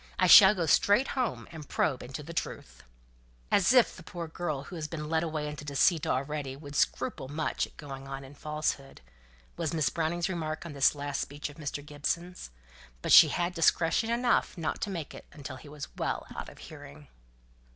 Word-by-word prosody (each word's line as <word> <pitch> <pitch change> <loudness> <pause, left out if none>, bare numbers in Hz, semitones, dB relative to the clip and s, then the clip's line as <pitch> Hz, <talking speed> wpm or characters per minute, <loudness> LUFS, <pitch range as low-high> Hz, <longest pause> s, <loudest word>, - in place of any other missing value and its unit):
I 185 - +3
shall 190 +3 +9
go 175 -3 0
straight 205 - +4
home, 255 -3 -2
and 155 -4 -10
probe 135 -5 0
into 135 +4 -7
the 165 +3 -8
truth." 60 - -5 0.7
"As 200 +2 +4
if 250 -2 +5
the - - -11
poor 170 0 -7
girl 155 -4 -4
who 180 - -10
has 155 -2 -4
been 150 -1 -6
led 160 0 +2
away 155 -2 -3
into 150 0 -7
deceit 145 +3 +2
already 135 0 -2
would 145 0 -10
scruple 130 -1 0
much 155 +3 -2
at - - -24
going 135 -2 -8
on 135 0 -6
in 135 +1 -12
falsehood," 150 -2 -3 0.6
was 155 - -2
Miss 150 -6 +2
Browning's 170 +3 -1
remark 160 -3 -4
on 165 - -7
this 140 +1 +3
last 145 0 -3
speech 145 +1 -5
of 145 - -14
Mr. 145 -2 -5
Gibson's; 170 - -4 0.5
but - - -1
she - - +10
had 175 +1 -1
discretion 165 +5 +2
enough 240 -3 +1
not 165 - -3
to 210 - -2
make 170 -6 -5
it - - -12
until 140 -3 -8
he 145 - -13
was 145 -1 -9
well - - -2
out - - -6
of - - -15
hearing. 75 0 -12
155 Hz, 195 wpm, -29 LUFS, 145-170 Hz, 0.7 s, she